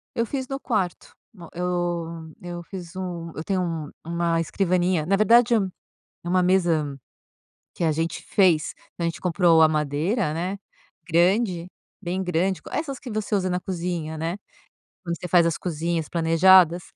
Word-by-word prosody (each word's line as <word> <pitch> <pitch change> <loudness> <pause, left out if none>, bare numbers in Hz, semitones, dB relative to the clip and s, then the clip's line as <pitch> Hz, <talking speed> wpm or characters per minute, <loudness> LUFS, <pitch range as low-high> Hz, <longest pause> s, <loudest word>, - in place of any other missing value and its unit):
Eu 230 - +1
fiz 260 +1 -4
no 270 0 -4
quarto 195 -10 -2 0.2
uma 175 -5 -12
eu 170 -2 -3
eu 175 -1 -6
fiz 175 -1 -9
um 175 -3 -5
eu 155 - -5
tenho 190 +1 0
um 165 -4 -3
uma 170 0 0
escrivaninha 180 -2 +1
na 195 +4 +2
verdade 235 +3 +5
um 195 -4 +1 0.6
é - - -4
uma 185 +1 +3
mesa 170 -6 +2 0.8
que - - -4
a 160 - +3
gente 160 +1 -2
fez 175 -6 +2 0.2
não, 170 - -1
a - - +2
gente 165 - -7
comprou 175 -2 +4
a - - +7
madeira, 150 - 0
né, 180 +5 -3 0.5
grande, 180 +1 +2 0.3
bem 185 0 -2
grande, 180 +1 0
c - - -31
essas 275 -4 -4
que 255 - -9
você 215 0 -3
usa 185 -1 0
na 180 - 0
cozinha, 170 -4 -4
né. 165 +4 -3 0.7
Quando 170 -2 -3
você 180 - -5
faz 175 -1 +5
as 165 - 0
cozinhas 165 -1 -2
planejadas, 170 +1 +5
175 Hz, 170 wpm, -24 LUFS, 165-190 Hz, 0.8 s, a